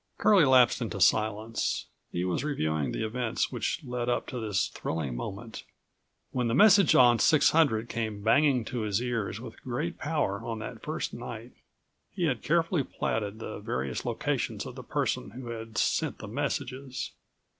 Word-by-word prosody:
Curlie 200 -7 +5
lapsed 130 -3 +5
into 110 -3 -3
silence. 110 +2 +1 0.3
He 90 +1 -1
was 90 +8 -1
reviewing 80 - -1
the 110 - -2
events 120 +1 -1
which 125 +6 -2
led 125 -2 -3
up 120 - 0
to 125 - -4
this 105 -4 0
thrilling 75 -6 -3
moment. 100 - -6 0.7
When 125 -2 0
the 115 - +1
message 200 0 +6
on 120 -2 +6
600 145 -7 +4
came 110 -4 -3
banging 130 +1 +4
to 125 +1 -4
his 105 -2 0
ears 115 -4 -2
with 115 -2 -10
great 150 +8 -3
power 145 -10 -1
on 115 -1 -4
that 110 - -7
first - - -3
night, - - -7 0.6
he 180 - -4
had 135 -8 +1
carefully 165 -1 +1
platted 105 -4 -3
the 110 - -6
various 65 0 -3
locations - - -2
of - - -7
the - - -8
person - - -1
who 120 +2 -8
had 115 -2 -7
sent - - +1
the - - -8
messages. 135 +1 -3
120 Hz, 165 wpm, -29 LUFS, 110-135 Hz, 0.7 s, message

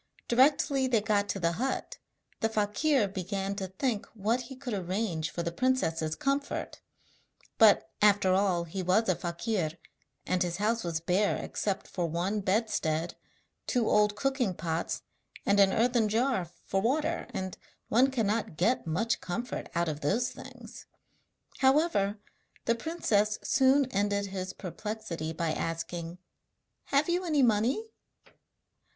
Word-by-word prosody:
Directly 270 +1 +3
they 240 -3 +3
got 205 -1 +1
to 195 - -1
the 170 -2 +1
hut 255 +11 -3 0.4
the 225 - +1
fakir 220 +4 +2
began 195 +1 -3
to 190 -2 -3
think 210 +3 -2
what 220 +4 0
he 250 +2 -9
could 255 -2 -5
arrange 185 -3 -2
for 170 - -4
the 170 - -2
princess's 170 -9 0
comfort; 280 -1 -2 0.8
but - - +6
after 205 -2 +5
all 185 -3 +2
he 170 +3 -5
was 185 +5 +2
a 185 - +3
fakir, 170 -1 -2 0.5
and 185 -1 0
his 175 -1 0
house 225 +3 0
was 165 -2 -2
bare 185 +5 +1
except 200 -2 -3
for 175 -2 -2
one 175 +6 -1
bedstead, 185 -5 0 0.5
two 240 -4 +1
old 210 0 +3
cooking 260 -6 0
pots 165 0 -3 0.4
and 200 0 +3
an 195 -1 +6
earthen 230 0 +2
jar 235 -3 +1 0.2
for 195 - 0
water, 305 +8 0
and 190 -1 -5 0.3
one 250 +5 +4
cannot 225 -8 -1
get 220 +2 +1
much 215 +8 0
comfort 240 +8 -4
out 170 0 +1
of 150 -2 -3
those 225 - +1
things. - - -11 0.7
However, 265 -7 +3 0.5
the 230 - +3
princess 225 -7 0
soon 270 +1 +4
ended 200 0 0
his 190 -1 -4
perplexity 180 -4 -5
by 165 0 -1
asking: 165 +1 -4 0.7
'Have 280 +2 +2
you 350 +1 +1
any 305 -6 +2
money?' 235 - +2
205 Hz, 140 wpm, -29 LUFS, 180-245 Hz, 0.8 s, but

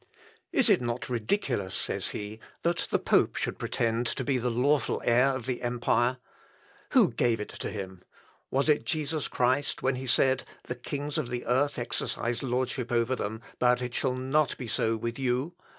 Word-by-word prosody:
"Is - - +4
it - - +5
not 120 +1 -3
ridiculous," 120 - -1
says - - -2
he, 105 +1 -6 0.2
"that 170 0 +1
the - - +3
pope - - +2
should - - -2
pretend 115 +1 0
to - - -2
be 135 -3 +1
the 125 +1 0
lawful 130 +2 +2
heir 125 +3 +5
of 125 -3 -5
the 130 -2 -2
empire? 120 +1 +1 0.8
Who - - +6
gave 115 -2 +1
it 105 - -5
to - - -5
him? 95 -3 -6 0.5
Was 135 +2 +1
it 150 -1 +4
Jesus 155 -1 -1
Christ, 130 +3 0
when 130 0 +1
he 130 +1 -5
said, 130 +1 +3 0.2
'_The 125 0 -5
kings 145 +4 -2
of 135 -6 -3
the 120 -1 -3
earth 140 +4 +2
exercise 120 0 -2
lordship 125 -1 -1
over 120 +2 +2
them, 110 -1 -4 0.2
but 125 0 +4
it 125 -1 -4
shall 130 0 0
not 135 +3 +1
be 125 - -6
so 110 +1 +1
with 115 +3 -4
you'? 130 +5 0
125 Hz, 180 wpm, -29 LUFS, 120-135 Hz, 0.8 s, Who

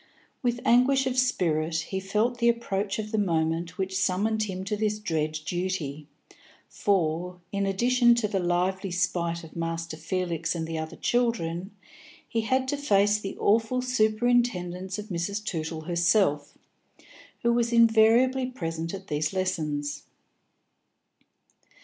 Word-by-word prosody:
With 240 -1 -1
anguish 265 +3 +4
of 260 -1 -1
spirit 170 -11 +1
he 165 +4 -2
felt 215 +6 0
the 235 0 +4
approach 205 -4 -1
of 215 -1 -5
the 220 - +1
moment 165 -2 0
which 190 -1 -2
summoned 205 +4 +1
him 190 -2 -5
to 205 +2 -2
this 210 0 0
dread 160 -7 -1
duty, 155 -4 -3 0.6
for, 180 -2 -1
in 200 0 -1
addition 240 +4 +4
to 235 -3 0
the 200 -2 -1
lively 185 +2 0
spite 175 -2 -1
of 160 - -13
Master 165 -1 -3
Felix 170 +1 -2
and 165 -1 -2
the 165 0 -5
other 160 0 -5
children, 195 -7 0 0.6
he 230 - -1
had 260 +4 0
to 290 - 0
face 205 -6 +3
the 195 -2 -6
awful 225 +4 +2
superintendence 215 -6 +1
of 210 +1 -7
Mrs. 200 +4 -3
Tootle 160 -4 -3
herself; 170 -2 +1 0.9
who 235 0 +3
was 235 0 +1
invariably 230 +3 +4
present 165 -7 -4
at 190 0 -9
these 150 -2 -1
lessons. 150 -6 -2
190 Hz, 135 wpm, -27 LUFS, 170-225 Hz, 0.9 s, anguish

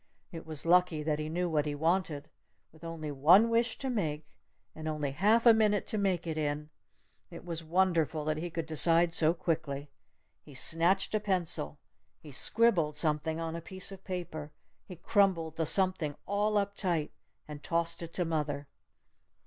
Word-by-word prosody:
It 165 -3 -9
was 155 -1 -4
lucky 175 -2 +3
that 150 -1 -1
he 155 0 -4
knew 175 +2 -1
what 155 -3 0
he 145 - -2
wanted. 160 -2 -1 0.4
With 160 0 -19
only 165 -2 -5
one 170 +11 +5
wish 230 0 +1
to 270 - -5
make 155 - -3 0.3
and 155 0 -7
only 150 -3 -2
half 210 - +2
a 235 - +9
minute 210 -2 +2
to 215 - -1
make 190 -4 0
it 160 -2 -3
in, 150 0 -3 0.6
it 170 0 -11
was 165 -2 -4
wonderful 165 -3 +1
that 155 0 -1
he 175 +3 -4
could 165 -1 -4
decide 165 +2 +3
so 165 +1 +4
quickly! 145 -5 -3 0.5
He 145 - -14
snatched 165 +10 +2
a 215 - +2
pencil! 180 - -1 0.4
He 150 - -12
scribbled 170 - +2
something 155 +1 0
on 165 0 -4
a 170 - -5
piece 185 +3 -3
of 190 -1 -11
paper! 160 -5 -6 0.4
He 180 - -9
crumpled 170 -3 +1
the 160 -2 -1
"something" 185 -6 +2
all 210 +1 0
up 200 0 -1
tight 170 -7 -1 0.4
and 150 -1 -9
tossed 170 +2 -1
it 165 -1 -7
to 180 - -1
mother! 150 -3 -2
165 Hz, 175 wpm, -30 LUFS, 155-185 Hz, 0.6 s, a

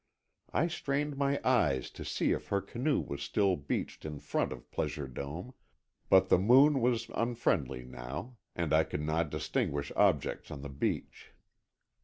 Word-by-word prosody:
I 165 - +2
strained 145 -3 -1
my 140 0 +1
eyes 120 - +2
to - - -8
see - - 0
if - - -2
her 100 - +1
canoe 120 +9 0
was 70 0 -5
still 95 +5 +2
beached 70 -3 -4
in 75 -1 -5
front - - -1
of - - -9
Pleasure 75 -2 -2
Dome, 75 - -6 0.6
but 95 0 +6
the - - +6
moon 135 +7 +6
was 115 -1 +1
unfriendly 85 - 0
now, 65 - -7 0.2
and 85 -3 -1
I 80 +1 +6
could 75 - -4
not 80 +1 0
distinguish 70 0 -2
objects - - +2
on 70 -1 -7
the 70 - -5
beach. 70 +1 -3
90 Hz, 160 wpm, -32 LUFS, -, 0.6 s, but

